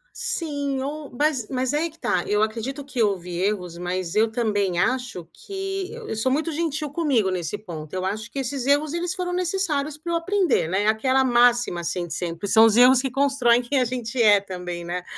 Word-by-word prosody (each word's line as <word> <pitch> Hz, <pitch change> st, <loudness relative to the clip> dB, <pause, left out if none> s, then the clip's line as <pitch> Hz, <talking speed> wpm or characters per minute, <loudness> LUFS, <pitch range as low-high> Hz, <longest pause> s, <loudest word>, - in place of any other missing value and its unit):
Sim, 285 Hz, -4 st, -3 dB
ou 290 Hz, +1 st, -5 dB
mas 290 Hz, -6 st, +1 dB
mas 260 Hz, 0 st, -1 dB
aí 315 Hz, +3 st, 0 dB
que 325 Hz, -, -20 dB
tá, 180 Hz, -, 0 dB
eu 210 Hz, +1 st, +2 dB
acredito 235 Hz, +6 st, -3 dB
que 260 Hz, -3 st, -3 dB
houve 185 Hz, -4 st, 0 dB
erros, 180 Hz, -3 st, -1 dB
mas 180 Hz, 0 st, -3 dB
eu 220 Hz, +1 st, +3 dB
também 205 Hz, -5 st, 0 dB
acho 245 Hz, -3 st, -1 dB
que 390 Hz, -, -5 dB
eu 470 Hz, -, -6 dB
sou 225 Hz, +4 st, +1 dB
muito 310 Hz, +5 st, 0 dB
gentil 305 Hz, -2 st, -2 dB
comigo 275 Hz, -, +1 dB
nesse 180 Hz, +1 st, -3 dB
ponto, 160 Hz, -7 st, -9 dB
eu 185 Hz, 0 st, -2 dB
acho 215 Hz, +4 st, -3 dB
que 275 Hz, -, -5 dB
esses 265 Hz, 0 st, -3 dB
erros 290 Hz, +2 st, +2 dB
eles 350 Hz, +1 st, -2 dB
foram 360 Hz, -2 st, -3 dB
necessários 340 Hz, -5 st, -1 dB
pra 335 Hz, +3 st, -5 dB
eu 335 Hz, -, +2 dB
aprender, 365 Hz, -, +1 dB
né, 190 Hz, +5 st, 0 dB
aquela 260 Hz, +5 st, +2 dB, 0.6 s
assim 175 Hz, +1 st, -3 dB
de 160 Hz, -, -6 dB
sempre, 170 Hz, +3 st, -4 dB
são 220 Hz, +2 st, +7 dB
os 220 Hz, -2 st, +4 dB
erros 250 Hz, +1 st, +7 dB
que 270 Hz, -, -2 dB
constroem 260 Hz, -3 st, +3 dB
quem 265 Hz, +3 st, 0 dB
a 250 Hz, -, +2 dB
gente 245 Hz, 0 st, -3 dB
é 205 Hz, -3 st, +6 dB
também 180 Hz, -3 st, -6 dB
não 170 Hz, +1 st, -4 dB
é? 180 Hz, -, -4 dB
250 Hz, 205 wpm, -24 LUFS, 195-295 Hz, 0.6 s, são